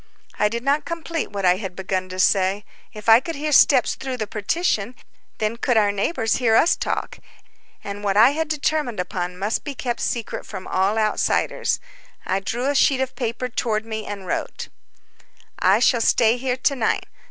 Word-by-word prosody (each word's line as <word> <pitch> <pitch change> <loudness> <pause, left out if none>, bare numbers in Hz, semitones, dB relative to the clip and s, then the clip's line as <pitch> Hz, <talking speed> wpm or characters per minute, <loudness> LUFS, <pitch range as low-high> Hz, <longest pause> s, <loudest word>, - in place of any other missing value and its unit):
I 210 - +3
did 235 +2 -4
not 280 +3 +1
complete 335 -1 -4
what 200 -2 -3
I 180 0 +4
had 190 -3 -6
begun 185 0 -3
to 185 0 -6
say. 195 +2 +2 0.3
If 215 -1 -11
I 225 +1 +8
could 330 +6 -6
hear 300 +2 -3
steps 270 -2 +5
through 265 -1 -5
the 220 - -2
partition, 220 - -1 0.4
then 215 +2 -1
could 240 0 +1
our 205 -2 +4
neighbors 225 +3 0
hear 230 -3 +2
us 330 - +4
talk, - - -3 0.6
and 200 0 -6
what 200 -1 0
I 230 +5 +7
had 320 +2 -2
determined 300 -6 -1
upon 180 0 -3
must 205 +4 -2
be 285 -2 -6
kept 240 -2 -3
secret 235 -3 -3
from 185 - -8
all 195 +3 0
outsiders. 215 -1 0 0.5
I 190 - 0
drew 235 +6 -3
a 285 - +2
sheet 270 -1 +3
of 265 0 -2
paper 240 0 -3
toward 225 -3 -2
me 220 -1 -5
and 200 -2 -6
wrote: - - -4 0.9
"I - - +4
shall 240 -3 +3
stay 230 +1 +3
here 250 0 -2
to 275 +2 +1
night. 235 -4 0
225 Hz, 185 wpm, -22 LUFS, 200-260 Hz, 0.9 s, I